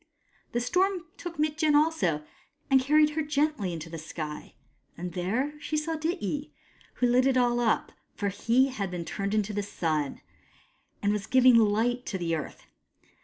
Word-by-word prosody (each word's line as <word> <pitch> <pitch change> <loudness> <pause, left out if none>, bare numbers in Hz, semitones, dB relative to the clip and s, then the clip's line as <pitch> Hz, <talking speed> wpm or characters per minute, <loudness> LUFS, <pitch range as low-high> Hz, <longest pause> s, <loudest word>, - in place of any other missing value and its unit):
The 240 - +1
storm 360 +7 +1
took 350 -2 -7
Mitjen 305 0 +2
also, 295 - +2 0.5
and 265 -1 +6
carried 300 +3 +4
her 315 +1 -1
gently 295 - 0
into 165 -1 -6
the 165 0 -7
sky; 155 -1 -7 0.4
and 175 0 -5
there 220 +11 -1
she 310 - -2
saw 320 +2 -1
Dityi, 310 - -2 0.5
who 250 - +1
lit 250 +2 +4
it 265 -1 +3
all 240 -1 +3
up, 230 -2 +1 0.2
for 205 - -1
he 235 +7 +2
had 205 -8 -3
been 175 -2 -5
turned 200 +3 -2
into 215 0 0
the 205 - -1
Sun, 155 -7 -2 0.8
and 205 0 +3
was 210 0 -3
giving 255 -1 +6
light 230 +3 +2
to 195 - -2
the 170 -2 -1
earth. 155 - -7
240 Hz, 170 wpm, -28 LUFS, 190-300 Hz, 0.8 s, and